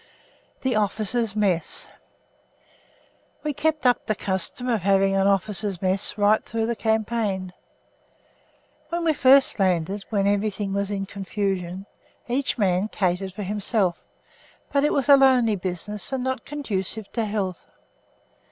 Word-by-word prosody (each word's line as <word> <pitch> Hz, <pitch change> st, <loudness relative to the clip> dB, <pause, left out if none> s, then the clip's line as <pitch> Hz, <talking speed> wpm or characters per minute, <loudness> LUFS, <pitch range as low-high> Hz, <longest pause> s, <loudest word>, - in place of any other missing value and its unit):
THE 260 Hz, -3 st, +1 dB
OFFICERS' 215 Hz, +1 st, -1 dB
MESS 190 Hz, -6 st, -1 dB, 1.6 s
We 300 Hz, -1 st, -1 dB
kept 310 Hz, +1 st, -1 dB
up 245 Hz, -1 st, +2 dB
the 215 Hz, -, +1 dB
custom 195 Hz, +6 st, -2 dB
of 230 Hz, -5 st, +1 dB
having 195 Hz, +1 st, +3 dB
an 195 Hz, 0 st, +3 dB
officers' 200 Hz, -1 st, +2 dB
mess 190 Hz, +3 st, +1 dB
right 210 Hz, +1 st, +3 dB
through 225 Hz, 0 st, -2 dB
the 235 Hz, +1 st, -1 dB
campaign. 220 Hz, -4 st, -1 dB, 1.4 s
When 340 Hz, +1 st, -2 dB
we 320 Hz, -1 st, +3 dB
first 270 Hz, -3 st, +5 dB
landed, 190 Hz, +1 st, 0 dB
while 200 Hz, -3 st, +1 dB
everything 205 Hz, -1 st, -1 dB
was 200 Hz, 0 st, -1 dB
in 195 Hz, -1 st, -2 dB
confusion, 195 Hz, -2 st, -3 dB, 0.4 s
each 255 Hz, +3 st, -1 dB
man 190 Hz, -2 st, +1 dB
catered 190 Hz, -2 st, -1 dB
for 205 Hz, +2 st, -5 dB
himself; 200 Hz, -2 st, 0 dB, 0.7 s
but 280 Hz, -1 st, +2 dB
it 295 Hz, -, +2 dB
was 275 Hz, -2 st, 0 dB
a 285 Hz, -, +9 dB
lonely 255 Hz, -5 st, +4 dB
business, 190 Hz, +4 st, -4 dB
and 265 Hz, -2 st, -2 dB
not 260 Hz, 0 st, -3 dB
conducive 220 Hz, -7 st, -4 dB
to 230 Hz, -2 st, -1 dB
health. 200 Hz, -4 st, -3 dB
205 Hz, 135 wpm, -24 LUFS, 195-235 Hz, 1.6 s, a